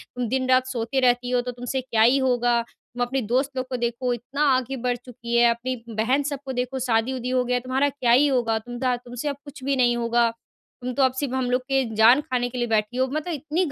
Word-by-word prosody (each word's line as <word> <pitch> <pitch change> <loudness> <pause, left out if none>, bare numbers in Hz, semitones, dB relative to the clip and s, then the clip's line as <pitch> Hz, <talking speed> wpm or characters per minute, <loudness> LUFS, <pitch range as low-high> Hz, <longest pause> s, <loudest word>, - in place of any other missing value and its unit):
तुम 245 -1 -2
दिन-रात 255 +1 +2
सोती 260 +1 -2
रहती 245 -1 +2
हो, 250 -1 +2
तो 250 0 -5
तुमसे 245 +2 -4
क्या 230 -3 0
ही 245 +5 +5
होगा। 245 -3 +2 0.3
तुम 245 - -5
अपने 260 +2 -1
दोस्त 255 +5 0
लोग 255 0 -2
को 260 - -2
देखो, 240 +1 -1
इतना 250 +5 -5
आगे 255 +1 -2
बढ़ 245 - +1
चुकी 235 -1 -5
है, 240 0 +6
अपनी 240 +2 -2
बहन 230 +6 +1
सब 285 -1 -3
को 265 - -4
देखो 250 +1 -2
शादी-वादी 250 +1 0
हो 255 0 +2
गया, 250 0 +1
तुम्हारा 260 +3 0
क्या 260 -4 0
ही 270 +5 +6
होगा? 240 -5 +1
तुम 240 +2 -8
दा 255 -1 +1
तुमसे 245 +3 -7
अब 280 - -3
कुछ 285 -2 -11
भी 275 +1 +1
नहीं 245 -2 +3
होगा। 235 0 +2 0.5
तुम 250 0 -3
तो 275 - +2
अब 260 -1 +3
सिर्फ़ 260 -1 -3
हम 255 -1 -1
लोग 250 +1 +2
के 270 +1 0
जान 230 +6 +6
खाने 250 -3 -2
के 250 - -7
लिए 240 -1 0
बैठी 220 +2 0
हो।" 260 - +3
मतलब 310 +5 -3
इतनी 310 +5 -1
250 Hz, 245 wpm, -24 LUFS, 240-265 Hz, 0.5 s, है